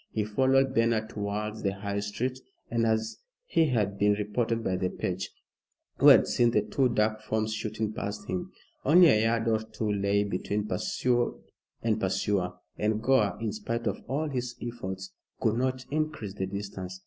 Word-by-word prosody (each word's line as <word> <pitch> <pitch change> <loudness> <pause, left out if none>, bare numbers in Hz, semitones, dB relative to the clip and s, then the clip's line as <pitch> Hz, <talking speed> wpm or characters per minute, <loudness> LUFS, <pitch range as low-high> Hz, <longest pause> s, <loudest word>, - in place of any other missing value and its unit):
He 110 - -1
followed 130 +4 +3
Bernard 115 -2 +2
towards 105 +1 -3
the 100 -1 -1
High 100 0 -3
Street, 120 +6 -3 0.3
as 110 -1 0 0.3
had 115 -11 +2
been 105 0 +4
reported 115 +3 -1
by 95 - 0
the 90 0 0
page, - - -3 0.7
who - - +6
had - - +9
seen 120 -1 +3
the 115 - +2
two 135 -2 +1
dark 110 -1 +1
forms 110 0 -1
shooting 110 0 -3
past 105 0 -5
him. 90 -1 -3 0.3
Only 170 +4 +7
a 110 -6 +4
yard 115 0 +1
or 110 -1 +3
two 110 -1 -3
lay 100 0 +2
between 100 +2 -2
pursued 120 +1 0 0.5
and 110 -1 +1
pursuer, 95 -1 0 0.3
and 105 0 +1
Gore, 110 -5 +2
in 110 -1 -2
spite 115 +2 -3
of 100 -2 -1
all 150 +4 -1
his 125 -3 -3
efforts, 95 -5 -5 0.3
could 110 0 +1
not 130 0 -1
increase 155 -10 -2
the 95 -2 -3
distance. 95 -2 -6
110 Hz, 165 wpm, -28 LUFS, 100-120 Hz, 0.7 s, had